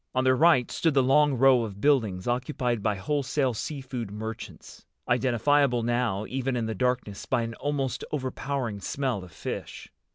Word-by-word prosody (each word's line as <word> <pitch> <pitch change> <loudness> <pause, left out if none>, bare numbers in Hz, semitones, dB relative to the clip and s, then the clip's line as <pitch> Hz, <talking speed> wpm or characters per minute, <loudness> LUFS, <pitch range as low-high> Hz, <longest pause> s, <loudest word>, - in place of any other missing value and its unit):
On 130 - +2
their 130 0 +4
right 150 -4 +4
stood 165 -4 +1
the 135 - +5
long 145 +2 +4
row 130 0 +5
of 100 -4 -5
buildings 110 -10 +1
occupied 125 -1 -1
by 105 0 0
wholesale 135 +4 0
sea 140 +6 -4
food 125 -5 -5
merchants—identifiable 120 +4 -1
now 120 -4 0
even 130 +1 -2
in 120 -2 -1
the 110 - -2
darkness 125 -5 -2
by 125 -3 +1
an 115 0 -4
almost 140 -3 -2
overpowering 130 -5 -3
smell 125 -2 -2
of 90 - -12
fish. - - -7
125 Hz, 160 wpm, -27 LUFS, 115-135 Hz, -, the